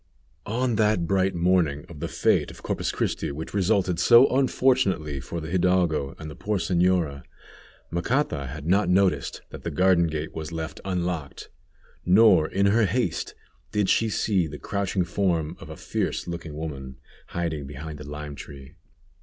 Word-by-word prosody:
On 120 +1 0
that 105 -5 +2
bright 95 +1 +1
morning 85 -4 +1
of 80 -4 -11
the 85 - -3
fête - - +1
of - - -13
Corpus - - -2
Christi, - - -2
which 75 +3 -7
resulted 95 -3 +1
so 120 +7 +7
unfortunately 125 - +2
for 70 +6 -5
the 80 0 -7
hidalgo 85 -6 +1
and 80 - -8
the 75 - -8
poor 105 0 -2
señora, 85 -4 +1 0.7
Macata 85 - -1
had 75 +3 -7
not 95 +4 +2
noticed 95 0 +1
that - - -9
the - - -3
garden 90 -2 +3
gate 75 0 -4
was 80 +1 -6
left 80 -1 -5
unlocked, 90 -5 -3 0.5
nor 90 -4 +5
in 100 +1 +1
her 105 +1 +4
haste 95 -5 -1 0.4
did 105 -2 +1
she 115 - +3
see 100 -5 +1
the 75 -1 -8
crouching 100 0 -1
form 85 -3 -1
of - - -11
a - - -8
fierce - - -2
looking 85 -3 -6
woman 70 -4 -6 0.3
hiding 80 -5 -3
behind 75 +2 -8
the 75 -1 -9
lime 75 0 -6
tree. 70 -1 -11
85 Hz, 160 wpm, -25 LUFS, 75-95 Hz, 0.7 s, so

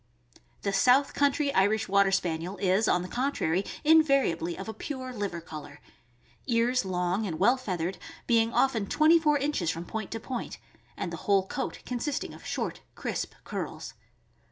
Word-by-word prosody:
The 200 - -1
south 255 +7 +4
country 285 0 +2
Irish 205 +3 +2
Water 200 0 +4
Spaniel 175 0 -1
is, 190 +3 +2
on 180 - +2
the - - -5
con 260 +8 -1
trary, 180 - -1 0.2
invariably 275 - +3
of 195 - -7
a 220 - -4
pure 260 -1 -6
liver 200 -6 -3
color. 150 -3 -10 0.7
Ears 240 +1 +2
long 185 +2 -1
and 160 -4 -3
well 235 +9 +4
feathered, 185 -8 -3 0.3
being 230 -1 +3
often 235 -6 +2
twenty 315 +7 +5
four 300 -2 +3
inches 280 - -1
from 165 +1 -3
point 220 +2 -5
to 225 - -4
point, 250 +1 -5 0.4
and - - -4
the - - -4
whole 195 -2 +4
coat 265 - -4
consisting 260 +4 -3
of - - -13
short, - - -3
crisp - - -4
curls. - - -5
220 Hz, 165 wpm, -28 LUFS, 185-265 Hz, 0.7 s, twenty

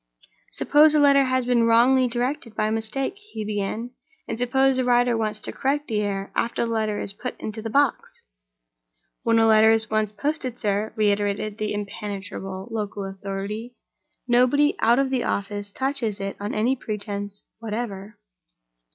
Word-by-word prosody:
"Suppose 300 +1 +5
a - - +5
letter 280 -1 +5
has 255 -1 +1
been 240 -2 +3
wrongly 250 +3 +5
directed 245 0 -3
by 215 0 0
mistake?" 225 - -1
he 410 - -7
began. 215 +3 -3 0.4
"And - - -3
suppose 265 +2 +3
the 260 - +2
writer 245 -1 +3
wants 215 -1 -1
to - - -3
correct 290 +2 -1
the 215 -2 -1
error 195 -1 -3
after 235 0 0
the 230 - -3
letter 215 -2 -1
is 200 - -1
put 250 +4 -6
into 215 0 -5
the 225 - -4
box?" 280 +3 0 1.0
"When 230 -1 +2
a 225 - +5
letter 220 0 +6
is 225 -1 +2
once 215 -1 +1
posted, 260 +1 -3
sir," 210 -1 0
reiterated 205 0 0
the 215 0 -1
impenetrable 200 -2 -5
local 205 -2 -3
authority, 200 +4 -6 0.5
"nobody 255 +5 +3
out 235 +2 +4
of 270 -1 +1
the 255 -2 0
office 205 0 -3
touches 260 -5 -2
it 195 0 -4
on 205 +1 -4
any 235 +5 +2
pretense 205 -3 -6 0.2
whatever." 215 -2 -5
225 Hz, 160 wpm, -24 LUFS, 205-250 Hz, 1.0 s, letter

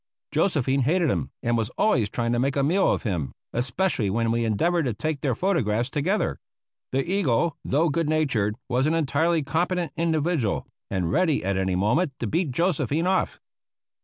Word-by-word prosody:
Josephine 140 -7 +1
hated 155 +3 +2
him - - -2
and 120 -1 +1
was 115 -2 0
always 125 - +2
trying 115 +1 -1
to 120 - +1
make 135 +2 0
a 140 - +2
meal 180 +7 +3
of - - -1
him, 80 - -2 0.2
especially 120 - 0
when 115 +3 0
we 115 0 0
endeavored 165 - +1
to 120 -5 -1
take 155 +5 -3
their 135 -5 0
photographs 125 - 0
together. 170 +6 0 0.5
The 135 +3 0
eagle, 170 -5 +1
though 155 +5 +2
good 155 +1 0
natured, 130 -10 +1
was 130 +2 +1
an 160 - +1
entirely 160 +1 +1
competent 170 +3 -1
individual 160 - 0 0.2
and 90 -4 -1
ready 160 -2 +2
at 100 0 0
any 95 -1 0
moment 130 - +1
to - - -2
beat 165 - 0
Josephine 160 - 0
off. 190 +1 0
140 Hz, 175 wpm, -25 LUFS, 115-170 Hz, 0.5 s, meal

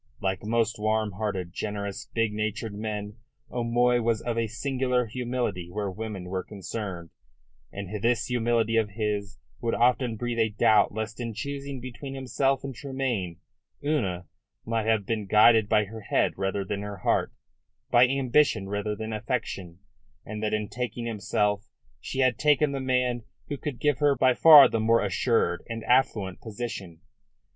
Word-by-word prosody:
Like 95 -1 -2
most 110 0 0
warm 110 0 +1
hearted, 95 -3 -3
generous, 100 -1 -4
big 115 -2 0
natured 110 +1 -3
men, 105 0 -5 0.3
O'Moy 120 0 +2
was 115 -1 +1
of 120 0 -3
a 115 -1 0
singular 125 +1 0
humility 120 -7 -3
where 100 +1 -3
women 105 -1 -5
were 95 +1 -3
concerned, 95 -4 -6 0.6
and 100 +1 -6
this 120 +1 +2
humility 115 -2 +1
of 110 -2 +2
his 105 -2 -2 0.2
would 115 -2 -1
often 125 -1 +2
breathe 120 0 -2
a 110 -1 +3
doubt 105 0 +4
lest 110 +1 -5
in 115 -3 -4
choosing 140 +3 -5
between 130 +2 -7
himself 135 +1 0
and 135 -1 -5
Tremayne 125 - -3 0.4
Una 95 - 0 0.4
might 115 -1 -1
have 110 -3 +2
been 110 -2 -2
guided 110 +1 +6
by 105 -1 +3
her 110 +2 -9
head - - +1
rather 95 0 -2
than 100 +1 -3
her 100 -1 -6
heart, - - +1 0.6
by 120 +1 +7
ambition 130 -5 +2
rather 105 +1 -2
than 110 +1 -5
affection, 105 -6 -4 0.4
and 105 0 -6
that 110 - 0
in 105 -1 -1
taking 120 0 -4
himself 105 -1 -1 0.3
she 135 - -3
had 130 -4 +2
taken 150 -1 +3
the 140 - -3
man 125 -2 0 0.3
who 145 - -2
could 140 -3 -5
give 145 -1 +1
her 145 -2 +4
by 130 0 +4
far 150 0 +9
the 115 - -1
more 115 0 +3
assured 100 -1 +1
and 115 -1 -4
affluent 110 -6 +1
position. 105 -7 -6
110 Hz, 160 wpm, -27 LUFS, 105-125 Hz, 0.6 s, far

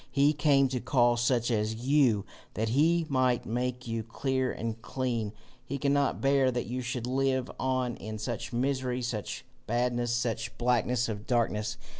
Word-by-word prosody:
He 145 +1 +3
came 145 -2 +4
to 125 -1 -1
call 120 -1 +3
such 120 0 +1
as 110 0 0
you, 125 -4 +3 0.3
that 110 +1 0
he 160 +7 +3
might 130 -3 +1
make 125 +2 -2
you 115 0 -2
clear 130 +3 -1
and 115 0 -4
clean. 120 -4 -2 0.3
He 140 +2 -4
cannot 140 0 +1
bear 135 -1 +4
that 125 -1 -2
you 125 +2 -3
should 125 -1 -3
live 130 0 0
on 130 -2 0
in 110 +2 -6
such 115 +1 -4
misery, 125 0 -1
such 110 -5 -4 0.2
badness, 120 +1 0
such 120 -1 -2
blackness 120 0 +1
of 105 -2 -5
darkness. 110 -3 0
125 Hz, 160 wpm, -29 LUFS, 115-130 Hz, 0.3 s, came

